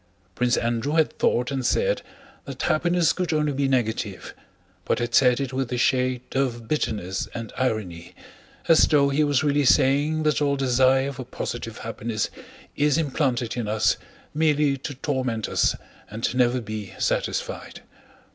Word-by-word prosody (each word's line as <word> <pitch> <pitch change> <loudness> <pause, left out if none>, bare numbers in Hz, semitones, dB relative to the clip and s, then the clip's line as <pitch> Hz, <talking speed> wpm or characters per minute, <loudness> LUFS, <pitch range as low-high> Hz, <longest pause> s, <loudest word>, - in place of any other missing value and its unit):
Prince 125 +4 +1
Andrew 120 +5 -1
had 160 -1 +1
thought 125 +3 +1
and 135 -2 -2
said - - +1 0.4
that - - -6
happiness 175 +1 +2
could 180 -2 -2
only 150 -2 +1
be 140 0 0
negative, 110 -6 -2 0.5
but - - 0
had 120 -1 -3
said 125 -1 +5
it 135 -2 -3
with 130 -1 -2
a 125 - -1
shade 125 0 +1
of 120 -4 -1
bitterness 105 -10 -2
and 115 -2 -6
irony 110 -9 -3 0.5
as 165 - +6
though 140 -2 +3
he 145 +2 +2
was 145 0 +2
really 145 -1 +2
saying 145 +4 +3
that 150 -1 +1
all 140 -1 +2
desire 130 +1 +2
for 135 -1 -7
positive - - -5
happiness 110 -1 -3 0.4
is 150 0 +2
implanted 130 -6 -1
in 120 -3 -3
us 105 0 +2 0.4
merely 150 -2 +2
to 140 +1 -7
torment 130 -5 -2
us - - +1 0.3
and 110 +2 -2
never 125 0 +2
be 110 -3 -7
satisfied. - - -2
130 Hz, 155 wpm, -24 LUFS, 120-145 Hz, 0.5 s, as